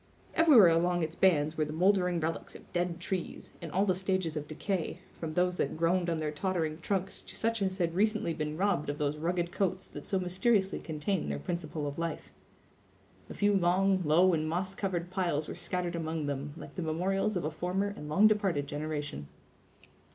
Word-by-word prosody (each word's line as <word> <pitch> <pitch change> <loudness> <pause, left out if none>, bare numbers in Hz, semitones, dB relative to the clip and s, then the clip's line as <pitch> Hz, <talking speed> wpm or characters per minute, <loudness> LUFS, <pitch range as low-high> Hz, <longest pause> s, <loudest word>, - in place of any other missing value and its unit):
Everywhere 285 - +7
along 175 +1 +2
its 160 0 -2
bands 160 -4 +3
were 155 - +3
the 150 - -6
moldering 180 0 +3
relics 165 +1 -3
of - - -14
dead 175 -1 -1
trees, 185 0 -4
in 165 - -6
all 190 +6 +2
the 185 - +3
stages 185 -3 -1
of 150 -1 -4
decay, 170 +3 -2 0.2
from 155 -2 -4
those 180 0 +2
that - - -1
groaned 170 +2 +2
on 165 - 0
their 155 -1 -2
tottering 160 -1 -1
trunks 190 +2 -1
to - - -10
such 230 -1 0
as 190 -1 0
had 170 -3 0
recently 215 -2 +1
been 155 -1 -3
robbed 180 -6 +1
of 145 - -2
those 150 0 -1
rugged 175 +1 -1
coats 190 -1 -1
that 145 - -9
so 195 - +1
mysteriously 190 +2 +1
contain 160 - -2
their 70 - -2
principle 155 - -4
of 145 +2 -4
life. 170 0 -4 1.0
A - - -7
few 205 0 +3
long, 190 +1 +3
low, 175 +4 +5
and 155 -1 0
moss 185 +3 -1
covered 180 -3 -3
piles 170 -5 0
were - - -5
scattered 180 -1 -3
among 160 -2 -2
them, 145 +1 -4
like - - -9
the 185 - -4
memorials 190 +5 0
of 180 - -2
a 155 - -1
former 185 +5 -1
and 150 - -8
long 195 +8 +5
departed 195 -9 +3
generation. 145 - -4
175 Hz, 195 wpm, -31 LUFS, 155-190 Hz, 1.0 s, Everywhere